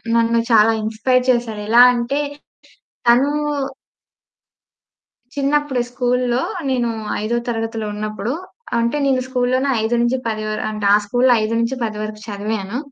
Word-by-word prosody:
నన్ను 230 Hz, 0 st, +3 dB
చాలా 220 Hz, 0 st, +6 dB
ఇన్‌స్పైర్ 250 Hz, +4 st, +1 dB
చేశాడు. 230 Hz, -3 st, -2 dB
ఎలా 240 Hz, +2 st, +8 dB
అంటే, 240 Hz, +4 st, -1 dB, 0.9 s
తనూ 255 Hz, +5 st, +5 dB, 2.0 s
చిన్నప్పుడే 280 Hz, -2 st, 0 dB
స్కూల్లో 250 Hz, 0 st, 0 dB, 0.3 s
నేను 245 Hz, -2 st, 0 dB, 0.3 s
ఐదో 235 Hz, +2 st, 0 dB
తరగతిలో 225 Hz, -1 st, -3 dB
ఉన్నప్పుడు, 215 Hz, +3 st, -3 dB, 0.5 s
అంటే 235 Hz, +5 st, 0 dB
నేను 260 Hz, -2 st, +2 dB
స్కూల్లోనే 255 Hz, +1 st, 0 dB
5-10 235 Hz, -1 st, 0 dB
వర్ 215 Hz, -, -3 dB
అంటే, 210 Hz, -1 st, -4 dB
ఆ -, -, +7 dB
స్కూల్‌లో 245 Hz, +4 st, +3 dB
5-10 230 Hz, 0 st, -1 dB
వరకు 215 Hz, 0 st, -6 dB
చదివాను. 205 Hz, +1 st, -3 dB
235 Hz, 110 wpm, -19 LUFS, 215-255 Hz, 2.0 s, ఎలా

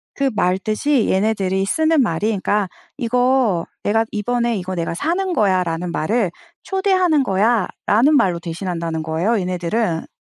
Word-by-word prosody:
그 275 Hz, -1 st, +1 dB
말 180 Hz, -1 st, +2 dB
뜻이 220 Hz, +6 st, 0 dB
얘네들이 195 Hz, -1 st, +1 dB
쓰는 315 Hz, +5 st, +2 dB
말이 210 Hz, -3 st, 0 dB
그러니까 205 Hz, -2 st, 0 dB, 0.3 s
"이거 245 Hz, -6 st, +1 dB, 0.2 s
내가 225 Hz, +2 st, +2 dB
이번에 235 Hz, +2 st, -1 dB
이거 185 Hz, 0 st, -4 dB
내가 170 Hz, -1 st, -2 dB
사는 355 Hz, -, -1 dB
거야."라는 180 Hz, -, 0 dB
말을 195 Hz, +4 st, 0 dB, 0.3 s
"초대하는 370 Hz, -6 st, +2 dB
거야."라는 225 Hz, +5 st, +2 dB
말로 180 Hz, -10 st, +2 dB
대신한다는 170 Hz, -2 st, -4 dB
거예요 170 Hz, +8 st, 0 dB
얘네들은. 180 Hz, 0 st, -2 dB
210 Hz, 335 characters per minute, -20 LUFS, 180-245 Hz, 0.3 s, 말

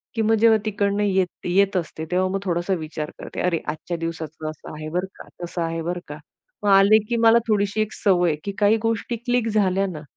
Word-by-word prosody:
की 225 Hz, -, 0 dB
मग 220 Hz, +1 st, +3 dB
जेव्हा 225 Hz, -1 st, +6 dB
तिकडून 200 Hz, -1 st, 0 dB
येत 190 Hz, -3 st, 0 dB
येत 195 Hz, +2 st, +2 dB
असते, 160 Hz, -2 st, -4 dB
तेव्हा 185 Hz, +1 st, +2 dB
मग 195 Hz, +1 st, -1 dB
थोडासा 175 Hz, +1 st, -1 dB
विचार 155 Hz, -1 st, -5 dB
करते. -, -, -6 dB
अरे, 175 Hz, -2 st, +1 dB
आजच्या 160 Hz, +3 st, -4 dB
दिवसाचं 160 Hz, -1 st, -5 dB
असं 155 Hz, -, -10 dB
आहे 155 Hz, 0 st, -6 dB
बरं 180 Hz, +3 st, -1 dB
का, -, -, -12 dB, 0.2 s
तसं 175 Hz, 0 st, -4 dB
आहे 165 Hz, 0 st, -2 dB
बरं 175 Hz, +1 st, -2 dB
का. 145 Hz, 0 st, -7 dB, 0.5 s
मग 205 Hz, -, +2 dB
आले 195 Hz, +2 st, +7 dB
की 235 Hz, -, +1 dB
मला 230 Hz, 0 st, +6 dB
थोडीशी 205 Hz, 0 st, +1 dB
एक 215 Hz, -, -2 dB
सवय 180 Hz, -4 st, +2 dB
आहे, 150 Hz, -, -1 dB
की 200 Hz, -, -3 dB
काही 210 Hz, +2 st, +4 dB
गोष्टी 225 Hz, +1 st, -1 dB
क्लिक 245 Hz, 0 st, 0 dB
झाल्या 195 Hz, -2 st, +2 dB
ना, 155 Hz, -5 st, -6 dB
190 Hz, 220 wpm, -23 LUFS, 165-210 Hz, 0.5 s, आले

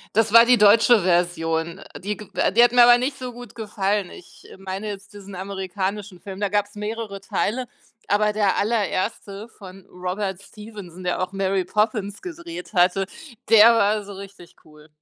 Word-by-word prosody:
Das 225 Hz, -1 st, +2 dB
war 230 Hz, 0 st, +9 dB
die 250 Hz, 0 st, +5 dB
deutsche 210 Hz, +1 st, +5 dB
Version, 170 Hz, -1 st, 0 dB, 0.2 s
die 205 Hz, +3 st, -4 dB
g 210 Hz, -, -11 dB
äh, -, -, +1 dB
die 235 Hz, +3 st, +5 dB
hat 240 Hz, 0 st, +5 dB
mir 245 Hz, -1 st, +6 dB
aber 240 Hz, 0 st, +7 dB
nicht 270 Hz, +3 st, -3 dB
so 250 Hz, -1 st, -6 dB
gut 245 Hz, 0 st, -12 dB
gefallen. 205 Hz, -3 st, -2 dB
Ich 180 Hz, -, -15 dB
meine 195 Hz, +2 st, -6 dB
jetzt 200 Hz, 0 st, -8 dB
diesen 200 Hz, -1 st, -11 dB
amerikanischen 190 Hz, 0 st, -5 dB
Film, 195 Hz, 0 st, -9 dB
da 205 Hz, -, 0 dB
gab's 205 Hz, +1 st, -1 dB
mehrere 210 Hz, -1 st, -5 dB
Teile, 240 Hz, +5 st, -2 dB, 0.4 s
aber 210 Hz, +1 st, +2 dB
der 205 Hz, -2 st, +1 dB
allererste 205 Hz, 0 st, -2 dB
von 195 Hz, -3 st, -14 dB
Robert 185 Hz, +1 st, -4 dB
Stevenson, 200 Hz, -5 st, -11 dB
der 180 Hz, +1 st, -1 dB
auch 185 Hz, +1 st, -4 dB
Mary 195 Hz, -1 st, -1 dB
Poppins 210 Hz, 0 st, -1 dB
gedreht 345 Hz, -6 st, -8 dB
hatte, 185 Hz, +1 st, +2 dB, 0.4 s
der 225 Hz, +1 st, +8 dB
war 210 Hz, -1 st, +2 dB
so 200 Hz, 0 st, -10 dB
richtig 190 Hz, -3 st, -12 dB
cool. 150 Hz, 0 st, -18 dB
200 Hz, 170 wpm, -22 LUFS, 190-220 Hz, 0.4 s, war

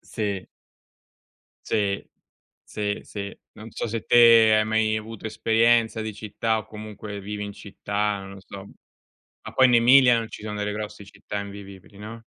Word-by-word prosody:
Sì. 100 Hz, -4 st, -4 dB, 1.2 s
Sì. 100 Hz, -3 st, -1 dB, 0.6 s
Sì, 105 Hz, -1 st, -3 dB
sì. 100 Hz, -1 st, -7 dB, 0.2 s
Non 110 Hz, +1 st, -11 dB
so -, -, -4 dB
se 115 Hz, 0 st, -4 dB
te 115 Hz, -2 st, +7 dB
hai 110 Hz, -, +3 dB
mai 110 Hz, 0 st, +1 dB
avuto 110 Hz, 0 st, -7 dB
esperienza 115 Hz, +1 st, +2 dB
di 110 Hz, -1 st, -5 dB
città, 110 Hz, +1 st, -2 dB
o 110 Hz, -, -6 dB
comunque 105 Hz, -1 st, -8 dB
vivi 105 Hz, +1 st, -5 dB
in 100 Hz, -, -7 dB
città, 105 Hz, 0 st, -3 dB
non 95 Hz, 0 st, -10 dB
lo 95 Hz, -, -12 dB
so. 95 Hz, +1 st, -11 dB, 0.8 s
Ma -, -, -9 dB
poi 130 Hz, -, +5 dB
in 125 Hz, -, +3 dB
Emilia, 125 Hz, +1 st, +6 dB
non 115 Hz, -1 st, -4 dB
ci -, -, -10 dB
sono 105 Hz, -1 st, -5 dB
delle 105 Hz, 0 st, -2 dB
grosse 105 Hz, -1 st, -6 dB
città 105 Hz, +1 st, -7 dB
invivibili, 100 Hz, 0 st, -10 dB
no? 115 Hz, +2 st, -9 dB
105 Hz, 165 wpm, -24 LUFS, 100-110 Hz, 1.2 s, te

